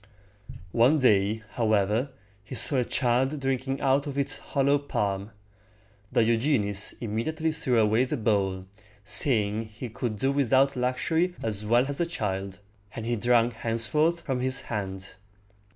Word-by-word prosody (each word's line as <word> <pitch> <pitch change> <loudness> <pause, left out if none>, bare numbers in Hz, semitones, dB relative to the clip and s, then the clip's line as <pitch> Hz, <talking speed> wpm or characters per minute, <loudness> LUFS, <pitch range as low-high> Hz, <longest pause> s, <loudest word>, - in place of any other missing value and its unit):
One 120 - +4
day, 110 -4 +2
however, 110 +2 +1 0.3
he 110 +5 -8
saw 130 +4 +6
a 125 - +2
child 130 +4 0
drinking 135 0 -2
out 140 +1 +2
of 140 -1 -5
its 140 +1 -1
hollow 140 0 +1
palm. 100 -7 -3 0.8
Diogenes 115 -3 +1
immediately 155 +9 -2
threw 155 -6 -1
away 110 +3 +3
the - - -3
bowl, 100 -4 0 0.4
saying 105 +1 +1
he 110 +3 -8
could 110 -1 -4
do 135 +6 0
without 135 0 +2
luxury 160 +8 0
as 105 -1 -3
well 120 +3 +3
as 140 -1 -4
the 170 - +1
child; 95 - -4 0.4
and 115 - -5
he 120 +1 0
drank 120 +1 +2
henceforth 115 +10 +1
from 135 -5 -3
his 130 +1 +1
hand. 95 -3 -6
120 Hz, 140 wpm, -26 LUFS, 105-135 Hz, 0.8 s, saw